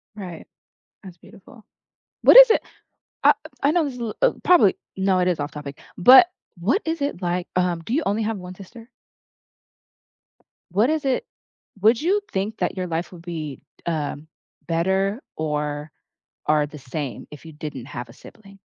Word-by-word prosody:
Right. 180 -6 -9 0.6
That's 185 -3 -12
beautiful. 220 +6 -17 0.6
What - - +7
is - - +11
it 445 - +3 0.6
I - - +7 0.3
I 285 - +3
know 340 -1 +2
this 275 - -4
is 250 - -9
a - - -4
l 225 - -4
uh, - - +5
probably 335 - +5 0.2
no, 190 -1 +2
it 180 - +2
is 180 -3 0
off-topic, 145 -1 -6 0.2
but 260 - +8 0.3
what 230 - +1
is 325 -1 -2
it 280 -9 -2
like, 175 0 -2
um, 180 -2 0
do 230 - -3
you 305 - +2
only 215 +2 0
have 220 -1 -2
1 180 0 -9
sister? 225 +5 -13 1.8
What 210 +8 +2
is 310 -2 -1
it 270 - 0 0.6
would 225 +3 +4
you 390 +6 +2
think 200 +3 -2
that - - -1
your 185 -1 -2
life 170 +2 -3
would 175 -2 -12
be, 155 -6 -6 0.2
um, 155 -2 -3 0.4
better 190 - 0
or 150 -1 -3 0.6
or 150 -1 +3
the 150 - -11
same 135 -1 -6
if 150 +1 -12
you 160 - -10
didn't 150 -5 -7
have 120 -4 -7
a - - -13
sibling? 200 - -16
185 Hz, 175 wpm, -23 LUFS, 155-225 Hz, 1.8 s, is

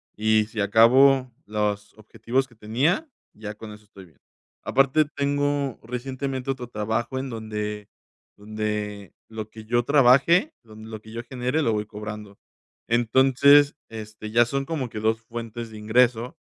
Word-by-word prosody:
y 110 0 +2
sí 110 0 -7
acabo 125 +5 +5
los 105 -1 -2
objetivos 120 +5 -2
que 120 - -22
tenía, 135 - 0 0.2
ya 105 -1 -8
con 110 0 -10
eso 105 0 -15
estoy 100 -2 -14
bien. 80 -6 -24 0.5
Aparte 135 +3 +3
tengo 145 -2 -1
recientemente 130 +2 -4
otro 125 -2 -6
trabajo 110 +4 -2
en 135 0 -5
donde 105 -2 -5 0.5
donde 105 -1 -4 0.2
lo 110 -1 -7
que 110 0 -12
yo 120 +2 +1
trabaje, 140 - +4
donde 110 -1 -13
lo 110 -1 -8
que 110 - -14
yo 115 +1 -6
genere 125 +4 -2
lo 115 - +1
voy 105 0 -2
cobrando. 105 -1 -8 0.5
Entonces 135 +5 +4
este 110 -1 -8
ya 120 +1 +5
son 135 +2 -2
como 145 -6 -3
que 110 - -6
dos 110 +1 0
fuentes 115 0 -7
de 110 - -10
ingreso 120 +2 +1
115 Hz, 155 wpm, -24 LUFS, 105-130 Hz, 0.5 s, acabo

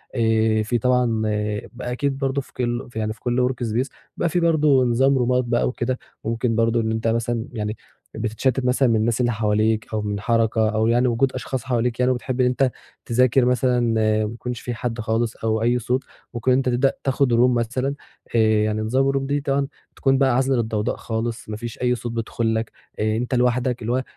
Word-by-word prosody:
آآ، 110 -2 +2
في 120 +3 0
طبعًا 125 -2 +1 0.5
بقى 125 0 -5
أكيد 135 +2 -1
برضه 135 0 -1
في - - -18
كُلّ 120 0 -2
يعني 110 -1 -1
في 110 - -22
كُلّ 125 +1 +1
work 125 -1 -4
space 120 +5 0 0.3
بيبقى 170 - +1
في 175 - +1
برضه 155 -5 +4
نظام 135 +3 +3
رومات 125 0 +2
بقى 120 0 +1
وكده، 125 0 -2 0.3
ممكن 115 +1 0
برضه 115 +1 +2
إن 110 0 -1
أنت 110 +1 -1
مثلًا 115 0 -1
يعني 105 -1 -3 0.4
بتتشتِّت 120 +4 -1
مثلًا 125 +1 +3
من 115 - +3
الناس 115 +3 +1
اللي 120 -1 +2
حواليك، 110 0 +1
أو 110 - 0
من 105 -1 -3
حركة 110 0 +2
أو 110 0 +1
يعني 120 +2 +3
وجود 125 +2 +1
اشخاص 130 -3 -4
حواليك 120 -1 -1
يعني 125 0 +3
وبتحب 130 0 -2
إن - - +4
أنت 125 +1 +2 0.3
تذاكر 125 +1 +3
مثلًا 125 0 +2
ما 110 -2 +2
يكونش 115 +3 -4
في 120 - -4
حد 120 0 -4
خالص، 115 +1 -1
أو 110 0 -1
أي 120 +2 +2
صوت 125 +3 -1 0.3
ممكن 120 +1 0
إن 125 - +4
أنت 130 -1 +1
تبدأ 125 +2 +2
تاخد 135 -2 +1
room - - +4 0.2
مثلًا 125 +4 -1 0.4
آآ، - - +4 0.3
يعني 110 0 -1
نظام 130 +5 +2
الroom 135 0 0
دي 140 +1 -1
طبعًا 140 0 0 0.3
تكون 135 -1 +2
بقى 130 -2 +3
عازلة 135 +1 +2
للضوضاء 110 -3 -1
خالص، 115 0 -4
ما 105 - -4
فيش 120 0 -7
أي 125 0 +2
صوت 120 0 -5
بيدخل 115 0 -1
لك، 110 0 -2 0.3
أنت 110 +4 0
لوحدك 125 0 +1
اللي 115 +1 -2
هو 130 +1 0
120 Hz, 205 wpm, -22 LUFS, 110-130 Hz, 0.5 s, برضه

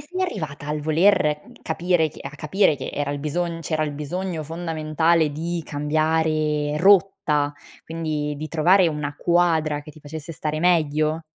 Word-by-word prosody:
sei 360 +6 -4
arrivata 155 - -4
al 150 0 -2
voler 155 -1 +3 0.2
capire 165 0 +1
che 150 - -14
a 140 - -6
capire 155 +3 +1
che - - -5
era 145 -1 -2
il 145 - -3
bisogn 165 +3 -2
c'era 155 -1 -1
il 145 - -4
bisogno 165 +3 -4
fondamentale 160 0 0
di 165 +3 -3
cambiare 155 0 0
rotta, 175 -6 +3 0.3
quindi 155 -2 -3
di 155 +2 -5
trovare 175 +3 +4
una 150 -2 -4
quadra 160 -4 +1
che 150 - -11
ti 155 - -16
facesse 155 +2 -7
stare 155 0 -3
meglio? 155 -2 +2
155 Hz, 155 wpm, -23 LUFS, 150-170 Hz, 0.3 s, trovare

